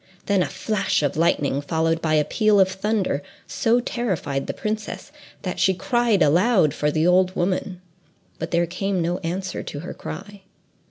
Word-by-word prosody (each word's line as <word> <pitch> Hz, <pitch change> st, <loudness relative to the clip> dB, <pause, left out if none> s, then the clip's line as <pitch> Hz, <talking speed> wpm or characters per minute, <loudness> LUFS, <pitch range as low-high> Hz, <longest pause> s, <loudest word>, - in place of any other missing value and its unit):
Then 200 Hz, -2 st, +2 dB
a -, -, +1 dB
flash 205 Hz, -7 st, -1 dB
of 145 Hz, -, 0 dB
lightning, 145 Hz, -3 st, +1 dB
followed 165 Hz, +2 st, 0 dB
by 155 Hz, -1 st, +1 dB
a 150 Hz, -, +4 dB
peal 215 Hz, -2 st, +3 dB
of 190 Hz, -, +6 dB
thunder, 190 Hz, -5 st, -1 dB, 0.2 s
so 230 Hz, +2 st, +1 dB
terrified 185 Hz, -, -2 dB
the -, -, -1 dB
princess, 215 Hz, +6 st, -4 dB, 0.3 s
that 180 Hz, -, -4 dB
she 190 Hz, -, +3 dB
cried 235 Hz, 0 st, +2 dB
aloud 175 Hz, -, +3 dB
for 150 Hz, -, 0 dB
the 155 Hz, +2 st, +1 dB
old 185 Hz, +1 st, +3 dB
woman, 180 Hz, 0 st, -1 dB, 0.6 s
but -, -, -3 dB
there 170 Hz, 0 st, +2 dB
came 185 Hz, +2 st, -2 dB
no 175 Hz, +2 st, -1 dB
answer 185 Hz, +2 st, -3 dB
to 145 Hz, -, -7 dB
her 175 Hz, -, -6 dB
cry. 205 Hz, -1 st, -8 dB
185 Hz, 170 wpm, -23 LUFS, 165-205 Hz, 0.6 s, of